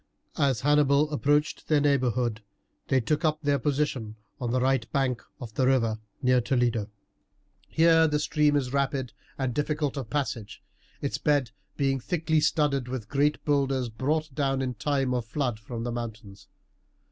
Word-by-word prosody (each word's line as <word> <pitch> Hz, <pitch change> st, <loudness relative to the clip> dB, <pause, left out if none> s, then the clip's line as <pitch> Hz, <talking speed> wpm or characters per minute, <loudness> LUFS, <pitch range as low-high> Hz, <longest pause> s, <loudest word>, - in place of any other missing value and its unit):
As 135 Hz, -6 st, +2 dB
Hannibal 145 Hz, +1 st, +3 dB
approached 145 Hz, +1 st, +1 dB
their 155 Hz, -2 st, +4 dB
neighbourhood 125 Hz, -5 st, +1 dB, 0.5 s
they 130 Hz, -, +3 dB
took 150 Hz, +7 st, -1 dB
up 155 Hz, -1 st, +1 dB
their 140 Hz, -1 st, +2 dB
position 135 Hz, -6 st, -1 dB, 0.2 s
on 120 Hz, -3 st, -2 dB
the 130 Hz, +2 st, +1 dB
right 130 Hz, -2 st, +1 dB
bank 135 Hz, -4 st, 0 dB, 0.2 s
of 120 Hz, -4 st, -8 dB
the 130 Hz, +2 st, +1 dB
river 115 Hz, -5 st, +2 dB, 0.2 s
near 125 Hz, 0 st, +4 dB
Toledo. 120 Hz, -4 st, 0 dB, 0.8 s
Here 165 Hz, 0 st, +5 dB
the 150 Hz, -1 st, +1 dB
stream 150 Hz, 0 st, +2 dB
is 130 Hz, -3 st, -1 dB
rapid 135 Hz, -2 st, -1 dB, 0.2 s
and 130 Hz, -3 st, -1 dB
difficult 150 Hz, +1 st, -1 dB
of 130 Hz, -5 st, -5 dB
passage, 125 Hz, -6 st, -3 dB, 0.4 s
its 140 Hz, -, -2 dB
bed 145 Hz, -6 st, +1 dB, 0.3 s
being 135 Hz, -1 st, +1 dB
thickly 160 Hz, +2 st, 0 dB
studded 145 Hz, -4 st, +1 dB
with 125 Hz, -4 st, -5 dB
great 145 Hz, +1 st, +1 dB
boulders 135 Hz, -4 st, +1 dB
brought 150 Hz, +6 st, -1 dB
down 135 Hz, 0 st, 0 dB
in 125 Hz, -1 st, -2 dB
time 135 Hz, +2 st, 0 dB
of 125 Hz, -1 st, 0 dB
flood 120 Hz, -2 st, -2 dB
from 115 Hz, +1 st, -6 dB
the 120 Hz, -, -2 dB
mountains. 110 Hz, -4 st, -7 dB
135 Hz, 160 wpm, -27 LUFS, 120-145 Hz, 0.8 s, Here